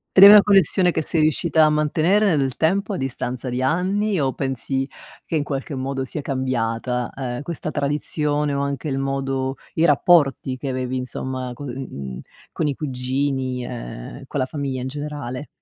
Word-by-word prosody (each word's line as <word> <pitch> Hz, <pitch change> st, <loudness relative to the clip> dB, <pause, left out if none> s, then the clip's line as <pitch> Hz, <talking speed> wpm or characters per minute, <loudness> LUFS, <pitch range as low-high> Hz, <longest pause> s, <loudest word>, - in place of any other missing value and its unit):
Ed 190 Hz, -, +9 dB
è -, -, +13 dB
una 210 Hz, 0 st, +10 dB
connessione 195 Hz, -2 st, +4 dB
che 160 Hz, -2 st, 0 dB
sei 160 Hz, +1 st, 0 dB
riuscita 155 Hz, +1 st, +3 dB
a -, -, +4 dB
mantenere 160 Hz, +6 st, +2 dB
nel 135 Hz, -3 st, 0 dB
tempo 195 Hz, +6 st, +1 dB
a -, -, -2 dB
distanza 130 Hz, -1 st, -3 dB
di 125 Hz, +1 st, -2 dB
anni, 190 Hz, +7 st, +1 dB
o 135 Hz, -2 st, +1 dB
pensi 135 Hz, 0 st, -2 dB, 0.3 s
che 165 Hz, -, -4 dB
in 150 Hz, -, +1 dB
qualche 140 Hz, 0 st, -4 dB
modo 135 Hz, 0 st, -2 dB
sia 145 Hz, +3 st, -5 dB
cambiata, 125 Hz, -2 st, -1 dB
ehm, 125 Hz, -2 st, -4 dB
questa 165 Hz, -1 st, -4 dB
tradizione 150 Hz, 0 st, -1 dB
o 140 Hz, -, 0 dB
anche 140 Hz, +1 st, -3 dB
il 135 Hz, -, -1 dB
modo 135 Hz, -1 st, -2 dB, 0.2 s
i 165 Hz, +1 st, +3 dB
rapporti 140 Hz, -3 st, +3 dB
che 135 Hz, -, -6 dB
avevi 130 Hz, 0 st, -2 dB
insomma 130 Hz, 0 st, -4 dB
con 140 Hz, +3 st, -7 dB
uhm 70 Hz, -, -6 dB, 0.3 s
con 155 Hz, -, -1 dB
i 140 Hz, -, 0 dB
cugini 130 Hz, -1 st, -2 dB
e -, -, -7 dB
con 145 Hz, -, -3 dB
la 130 Hz, -, +2 dB
famiglia 135 Hz, -3 st, -3 dB
in 130 Hz, -, -3 dB
generale? 145 Hz, -2 st, -5 dB
135 Hz, 175 wpm, -22 LUFS, 130-155 Hz, 0.3 s, è